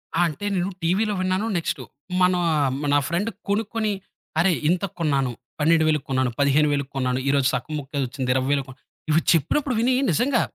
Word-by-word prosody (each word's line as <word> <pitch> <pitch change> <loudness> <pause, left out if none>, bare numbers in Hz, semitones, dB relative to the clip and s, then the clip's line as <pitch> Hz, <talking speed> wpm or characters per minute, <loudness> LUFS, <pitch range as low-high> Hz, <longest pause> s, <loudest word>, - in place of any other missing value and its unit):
ఆ! - - +1
అంటే, 165 +5 -6
నేను 180 +1 0
టీవీలో 200 +6 +1
విన్నాను. 185 +3 0
నెక్స్టు 160 -5 -2 0.4
మనా 180 -1 +3 0.5
నా 145 - +5
ఫ్రెండ్ 180 +7 -1 0.2
కొనుక్కొని 215 +1 0 0.5
"అరే 180 +3 +4 0.2
ఇంతకు 180 +1 0
కొన్నాను. 140 -5 +1 0.3
12000కు 155 -2 +3
కొన్నాను, 130 -2 +1
15000కు 140 0 +2
కొన్నాను. 130 -1 0
ఈరోజు 140 -2 +3
సగం 125 +5 -3
ముక్కే 140 +1 -5
వచ్చింది 130 0 -2
20000కు" 135 0 0 0.4
ఇవి 155 +2 +4
చెప్పినప్పుడు 250 - +1
వినీ, 250 +2 +3 0.2
నిజంగా, 245 - +2
155 Hz, 150 wpm, -23 LUFS, 140-185 Hz, 0.5 s, నా